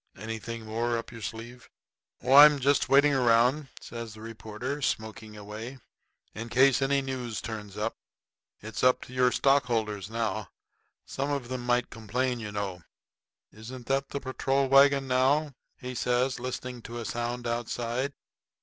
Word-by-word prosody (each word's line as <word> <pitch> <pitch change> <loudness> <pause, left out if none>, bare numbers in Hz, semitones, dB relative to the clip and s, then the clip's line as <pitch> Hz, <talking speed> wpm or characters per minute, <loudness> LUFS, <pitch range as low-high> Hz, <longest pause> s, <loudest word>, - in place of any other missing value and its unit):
Anything 110 +2 -6
more 115 +2 -1
up 115 - -6
your 115 -2 -10
sleeve?" 115 +3 -7 0.5
"Oh, 130 - +2
I'm 145 +1 +10
just 140 +1 +2
waiting 145 +1 +5
around," 125 +3 +3
says 115 -2 -8
the 110 - -12
reporter, 115 +5 -6
smoking 110 -3 -3
away, 110 +5 -8 0.6
"in 115 +1 -6
case 130 +3 +4
any 135 0 +2
news 125 -4 -4
turns 105 -3 -7
up. 110 +2 -2 0.7
It's 110 0 -6
up 125 0 +4
to 125 - -12
your 125 -1 +3
stockholders 115 -8 +1
now. 110 -3 -2 0.6
Some 140 +2 -3
of 140 -4 -2
them 130 -1 -4
might 120 -1 +1
complain, 125 +3 -2
you 105 -2 -6
know. 100 -3 -4 0.7
Isn't 120 +4 -10
that 135 +1 0
the 140 - -3
patrol 135 +1 0
wagon 140 0 +5
now?" 135 +4 +2 0.2
he 125 -1 -6
says, 125 +1 0
listening 125 0 -5
to 120 +1 -8
a 115 - -5
sound 120 +4 -3
outside. 120 +3 -2
120 Hz, 150 wpm, -28 LUFS, 110-135 Hz, 0.7 s, I'm